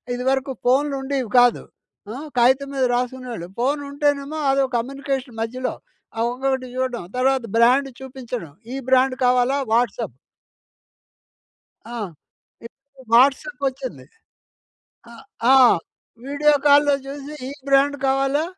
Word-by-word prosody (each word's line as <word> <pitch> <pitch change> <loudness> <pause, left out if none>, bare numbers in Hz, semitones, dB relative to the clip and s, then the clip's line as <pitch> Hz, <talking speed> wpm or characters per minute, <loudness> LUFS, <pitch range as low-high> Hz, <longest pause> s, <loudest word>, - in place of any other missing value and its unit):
ఇది 250 - -4
వరకు 270 0 -1
ఫోన్‌లు 275 +3 +2
ఉండేవి 265 -4 -2
కాదు. 245 -1 +4 0.5
అ! - - -6 0.2
కాగితం 260 +3 +3
మీద 265 -1 +2
రాసుకునేవాళ్ళు. 245 -7 -4
ఫోన్ 280 +4 +1
ఉంటేనేమో 285 +1 -1
అదో 275 0 +2
కమ్యూనికేషన్ 270 -1 -4
మధ్యలో 255 +3 -3 0.5
అ! - - +1
ఇంకొకటి 265 0 -2
చూడడం. 255 -4 -2
తర్వాత 265 0 +2
బ్రాండ్ 255 +4 +4
చూపించడం. 250 - -7 0.2
ఈ - - -3
బ్రాండ్ 260 0 +3
కావాలా? 250 +2 +3
వాట్సాప్ 235 +2 0 1.7
ఆ! - - -8 0.7
ఇప్పుడు 270 +2 -16
వాట్సాప్ 275 - +3
వచ్చింది. 265 -1 -6 1.1
అ! - - -12 0.4
ఆ! - - +8 0.7
వీడియో 285 +2 +2
కాల్‌‌లో 290 0 +5
చూసి 285 +2 -7 0.2
ఈ - - -6 0.2
బ్రాండ్ 275 +1 +3
కావాలా? 270 +3 +1
265 Hz, 115 wpm, -22 LUFS, 250-280 Hz, 1.7 s, ఆ